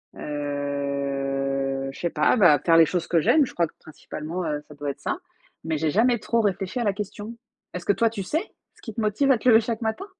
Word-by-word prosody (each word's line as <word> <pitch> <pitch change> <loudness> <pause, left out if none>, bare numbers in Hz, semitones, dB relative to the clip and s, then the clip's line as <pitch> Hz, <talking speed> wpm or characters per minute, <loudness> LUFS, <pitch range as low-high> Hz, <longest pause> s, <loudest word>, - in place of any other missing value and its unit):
Heu, 140 -2 -2
je - - -13
sais 170 - -1
pas, 155 +10 +2
bah, 170 -8 +6
faire 165 -1 +5
les 165 - +8
choses 170 +1 -2
que 170 - +3
j'aime, 295 - +4
je - - -10
crois 170 -1 +1
que - - -22
principalement, 160 +3 -6
heu, 150 -2 -2
ça 150 - -13
doit 145 0 -4
être - - -13
ça, - - -2 0.5
mais 160 -1 -1
j'ai 155 0 0
jamais 235 +5 +3
trop 230 +2 0
réfléchi 200 +2 -1
à - - 0
la 205 - +2
question. 210 +2 -6 0.4
Est-ce 180 -1 -6
que 205 - +3
toi 230 +3 +2
tu 215 -3 -5
sais, 315 - -2 0.2
ce - - -23
qui 225 - -8
te 225 - -3
motive 215 +6 +2
à 260 - +4
te 250 - +2
lever 225 -2 +8
chaque 230 0 -3
matin? 225 - -2
170 Hz, 240 wpm, -25 LUFS, 145-220 Hz, 0.5 s, les